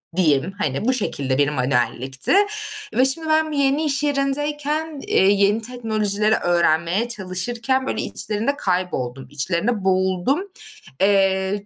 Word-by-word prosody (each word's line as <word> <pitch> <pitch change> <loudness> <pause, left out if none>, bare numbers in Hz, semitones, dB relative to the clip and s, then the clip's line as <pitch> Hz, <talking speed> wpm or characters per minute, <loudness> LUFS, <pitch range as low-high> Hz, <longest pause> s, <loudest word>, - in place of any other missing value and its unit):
diyeyim. 160 -1 +1
Hani, 145 0 -2
bu 260 - +2
şekilde 135 - -2
bir 145 0 +2
manuellikti. 130 - 0 0.6
Ve 255 - +3
şimdi 315 +4 +1
ben 315 0 +2
yeni 280 +1 +1
iş 285 -1 +2
yerindeyken, 295 +2 -1
eee, - - +3
yeni 200 +2 +2
teknolojileri 215 -3 0
öğrenmeye 175 +5 +1
çalışırken, 235 +6 -1
böyle, - - -2
içlerinde 220 +6 -2
kayboldum, 180 - -3
içlerinde 180 - -2
boğuldum. 190 - +1 0.6
Eee 195 0 +2
205 Hz, 120 wpm, -21 LUFS, 175-265 Hz, 0.6 s, Ve